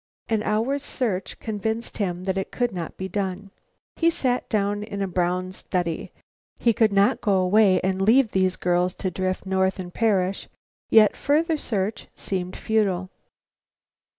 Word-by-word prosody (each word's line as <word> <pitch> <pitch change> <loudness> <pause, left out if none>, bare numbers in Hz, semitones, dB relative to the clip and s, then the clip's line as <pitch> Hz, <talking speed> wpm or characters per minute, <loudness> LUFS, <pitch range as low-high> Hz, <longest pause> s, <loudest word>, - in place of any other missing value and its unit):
An 220 -2 +1
hour's 230 +7 0
search 220 -9 -3
convinced 220 +2 -3
him 180 -3 -2
that 190 0 -1
it 195 0 -2
could 245 -1 0
not 170 -3 -6
be 190 - -4
done. 195 0 -3 0.5
He 335 - +4
sat 255 -6 -1
down 205 -1 0
in 210 -1 -6
a 195 - 0
brown 180 +1 -1
study. 175 -3 -3 0.5
He 235 - +3
could 215 0 +3
not 200 0 +3
go 200 -2 +2
away 190 +1 +4
and 190 0 -1
leave 225 +3 +4
these 185 -1 +2
girls 180 +1 +1
to 185 - -3
drift 185 +1 -2
north 190 0 +1
and 180 -2 -7
perish, 195 -4 0 0.4
yet 215 -2 +6
further 315 +3 +1
search 210 -7 -3
seemed 185 -2 -4
futile. 195 -4 0
195 Hz, 155 wpm, -24 LUFS, 185-220 Hz, 0.5 s, yet